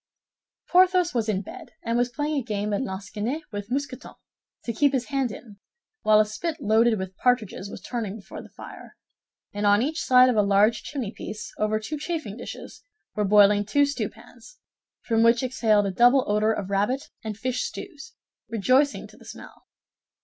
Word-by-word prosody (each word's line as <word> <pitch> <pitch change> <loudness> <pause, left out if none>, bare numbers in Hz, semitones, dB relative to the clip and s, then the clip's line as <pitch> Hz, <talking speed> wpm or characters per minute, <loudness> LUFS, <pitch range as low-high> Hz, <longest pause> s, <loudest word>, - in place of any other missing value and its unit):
Porthos 365 -1 +4
was 230 -3 -1
in 200 -1 -1
bed, 330 0 -11
and 230 - -1
was 245 +1 +1
playing 295 +4 -2
a 280 - 0
game 210 -2 -3
at 200 - 0
lansquenet 210 +6 -4
with 205 0 -6
Mousqueton, 265 0 -4 0.5
to 235 - -3
keep 285 +4 +2
his 255 -1 -1
hand 270 -4 0
in; 210 -2 -11 0.4
while 215 0 +5
a 215 - +5
spit 310 +10 -4
loaded 220 +1 +3
with 190 -1 -6
partridges 220 -6 0
was - - -9
turning 225 -5 -4
before 210 - -10
the - - -14
fire, - - -12 0.6
and 205 0 0
on 205 +3 +4
each 310 +4 -2
side 255 0 +6
of 250 - +2
a 210 - +4
large 205 +3 +3
chimneypiece, 225 -5 -6
over 215 0 +1
two 295 +8 -5
chafing 310 - -4
dishes, 240 - -9 0.3
were 210 - -1
boiling 205 0 +5
two 285 +8 +2
stewpans, 290 - -7 0.4
from 225 -1 +1
which 230 +2 +4
exhaled 220 -5 +2
a 195 - -1
double 245 +6 +5
odor 210 +1 +2
of 200 -3 -4
rabbit 210 +8 -1
and 215 -2 -5
fish 250 +2 -2
stews, 395 - -8 0.3
rejoicing 255 +6 +2
to - - -16
the - - -17
smell. - - -12
230 Hz, 180 wpm, -25 LUFS, 210-270 Hz, 0.6 s, side